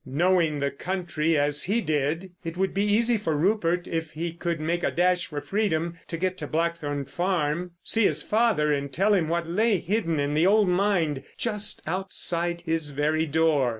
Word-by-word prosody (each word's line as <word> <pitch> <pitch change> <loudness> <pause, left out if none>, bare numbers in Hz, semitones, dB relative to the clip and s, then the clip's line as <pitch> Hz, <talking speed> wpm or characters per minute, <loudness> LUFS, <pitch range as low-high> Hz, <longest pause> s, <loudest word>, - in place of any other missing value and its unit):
Knowing 165 +2 +2
the 140 0 -1
country 170 -1 -1
as 145 0 +1
he 210 +5 +1
did 155 +1 -1
it 165 0 -5
would 190 0 0
be 200 - +1
easy 225 +3 +2
for 160 -7 -1
Rupert, 175 0 +1
if 165 -1 -3
he 165 +1 -3
could 170 -1 -3
make 170 +3 -1
a - - +1
dash 180 0 +1
for 150 - -4
freedom, 170 -1 -1
to 165 - -4
get 185 +2 -2
to 150 - -5
Blackthorn 155 -3 -1
Farm, 175 0 -1
see 225 -2 +2
his - - +1
father 210 -10 +2
and 140 -1 -2
tell 195 +9 +2
him 175 -6 +2
what 170 0 -1
lay 210 +5 +2
hidden 170 -3 -1
in 145 +1 0
the 160 +4 +3
old 210 0 +4
mine 180 -7 +1
just 210 -3 -2
outside 175 -1 -2
his 160 -2 0
very 155 +3 0
door. 150 -4 +2
170 Hz, 185 wpm, -26 LUFS, 155-190 Hz, -, old